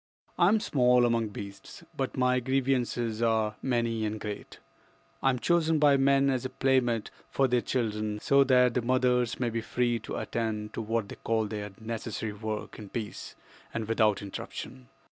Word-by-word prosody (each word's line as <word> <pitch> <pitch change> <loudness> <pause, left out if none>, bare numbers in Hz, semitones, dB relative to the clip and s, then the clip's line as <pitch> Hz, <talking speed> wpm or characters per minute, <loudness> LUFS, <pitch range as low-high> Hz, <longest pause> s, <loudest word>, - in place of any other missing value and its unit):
"I 175 - +6
am 215 +3 +4
small 125 -8 +3
among 115 -2 +1
beasts, 100 -1 -9
but - - -3
my 125 0 +3
grievances 125 -3 0
are 110 -2 +1
many 115 -3 0
and 110 0 -2
great. 105 -1 -7 0.6
I 135 - +3
am 125 - +1
chosen 165 +3 +2
by 145 -2 +5
men 135 0 +4
as 130 -2 -1
a 130 - -3
playmate 130 -4 +1 0.2
for 135 - +2
their 125 -1 +2
children, 105 -4 -1
so 140 +5 +4
that 125 -2 +4
the 125 - +1
mothers 125 -1 +1
may 120 -2 0
be 115 0 -2
free 120 +1 0
to - - -6
attend 110 -2 -3
to - - -3
what 110 -1 -1
they - - -9
call 110 -1 0
their 105 -1 -5
'necessary 110 -1 -4
work' 110 +1 -5
in 105 -2 -9
peace 110 -2 -6 0.4
and 110 -2 -2
without 110 -2 +2
interruption. 65 -9 -7
120 Hz, 175 wpm, -29 LUFS, 110-130 Hz, 0.6 s, I